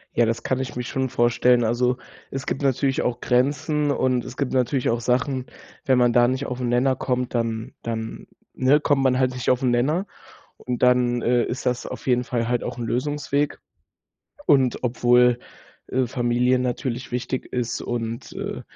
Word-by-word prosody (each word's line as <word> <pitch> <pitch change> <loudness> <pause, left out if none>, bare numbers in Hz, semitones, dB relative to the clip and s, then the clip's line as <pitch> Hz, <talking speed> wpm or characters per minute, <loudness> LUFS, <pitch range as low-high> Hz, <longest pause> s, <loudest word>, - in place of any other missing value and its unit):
Ja, 120 -1 +4
das 115 0 -2
kann 130 - 0
ich 130 -2 -4
mich 125 -1 -4
schon 130 +1 -1
vorstellen. 120 +1 +3
Also, 125 +2 +1 0.3
es 135 -1 -5
gibt 135 - -3
natürlich 135 0 +1
auch 120 -1 -1
Grenzen, 145 +4 +1
und 130 -3 +1
es 125 - -9
gibt 140 -3 -2
natürlich 130 0 +1
auch 115 0 0
Sachen, 130 +2 0 0.4
wenn 130 -1 +3
man 120 -1 +4
da 120 0 +5
nicht 130 +2 -1
auf 125 -1 -4
'n 125 - -1
Nenner 130 +2 +2
kommt, 125 -1 -2
dann 115 -2 -2
dann, 115 -1 -5 0.3
ne, 135 +3 +3
kommt 145 -2 +2
man 130 -1 +3
halt 130 -1 +1
nicht 125 -2 -2
auf 125 +1 +2
'n 125 - +3
Nenner, 150 +10 +1 0.5
und 125 -1 -4
dann, 125 -1 +3
äh, 120 0 +3
ist 125 - -5
das 125 -1 -1
auf - - -8
jeden 125 -1 +2
Fall 120 -2 -2
halt 120 0 0
auch - - -5
'n 120 - -3
Lösungsweg. 145 +4 -1 0.9
Und 130 -3 +3
obwohl, 125 0 +4 0.5
äh, 130 0 0
Familie 125 +1 +1
natürlich 125 0 -3
wichtig 125 +1 -3
ist 125 -2 -2
und, 115 -1 -4
äh, - - -5
125 Hz, 185 wpm, -23 LUFS, 120-130 Hz, 0.9 s, da